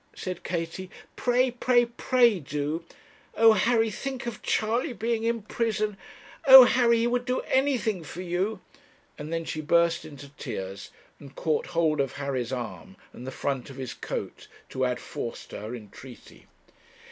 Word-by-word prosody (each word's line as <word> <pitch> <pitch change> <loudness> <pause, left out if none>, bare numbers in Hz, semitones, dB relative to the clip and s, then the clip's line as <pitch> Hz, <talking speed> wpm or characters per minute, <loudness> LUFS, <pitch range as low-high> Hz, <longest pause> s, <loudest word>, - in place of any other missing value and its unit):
said 185 -2 -5
Katie, 175 +1 -4 0.3
'pray, 250 +1 +2
pray, 245 0 +3
pray, 235 -2 +2
do! 150 +2 -3 0.5
Oh, 225 0 +7
Harry, 225 +2 +2
think 265 +4 -5
of 235 -2 -5
Charley 235 +6 0
being 225 +1 -1
in 230 -1 0
prison! 215 -2 -1 0.5
Oh, 265 -1 +13
Harry, 240 -1 +4
he 230 - +1
would 245 +1 +1
do 250 +1 -1
anything 255 -9 0
for 175 +4 -7
you!' 185 +3 -2 0.6
and 150 +2 -6
then 165 0 -2
she 155 - -4
burst 170 +2 +2
into 145 -3 -11
tears, 100 -9 -6 0.3
and 140 -1 -13
caught 155 -2 -1
hold 155 -3 +3
of 135 -2 -2
Harry's 135 -3 -3
arm 110 - -6 0.2
and 125 - -9
the - - -4
front 135 -1 -3
of 135 - -10
his 130 -3 -5
coat - - -6 0.2
to 130 0 -1
add 125 -1 -1
force 115 - -6
to - - -8
her 110 +4 -6
entreaty. 120 +3 -13
175 Hz, 160 wpm, -27 LUFS, 140-235 Hz, 0.6 s, Oh